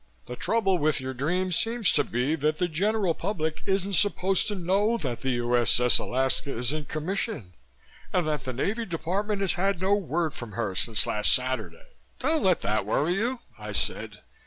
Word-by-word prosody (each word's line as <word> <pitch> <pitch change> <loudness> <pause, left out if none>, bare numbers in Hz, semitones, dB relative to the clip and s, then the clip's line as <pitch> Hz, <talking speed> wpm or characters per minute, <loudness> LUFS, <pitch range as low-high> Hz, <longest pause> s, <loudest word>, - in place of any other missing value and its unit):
The 125 - -7
trouble 195 - +1
with 155 -1 +1
your 130 0 -4
dream 175 +8 -1
seems 225 +3 +2
to 145 - +3
be 125 +4 -1
that 155 +1 0
the 180 - +1
general 195 +2 +1
public 160 -4 -3
isn't 195 0 0
supposed 195 -1 +3
to 210 - -1
know 200 +5 +1
that 130 - -4
the 135 - -1
U.S.S. 120 0 +3
Alaska 130 +1 -1
is 125 +4 +1
in 155 -1 -4
commission 155 - -4 0.6
and 180 -4 +1
that 150 -4 -2
the 130 - -3
Navy 205 - -2
department 195 +5 -2
has 190 -4 +2
had 195 0 0
no 190 +2 +2
word 170 -5 -1
from 120 -3 -8
her 110 -4 -2
since 105 +2 +3
last 105 0 +3
Saturday." 130 - -3 0.3
"Don't 320 0 +1
let 185 -4 +2
that 105 +1 0
worry 150 +10 +1
you," 235 +6 -1 0.2
I - - -6
said. - - -2
165 Hz, 185 wpm, -26 LUFS, 130-195 Hz, 0.6 s, to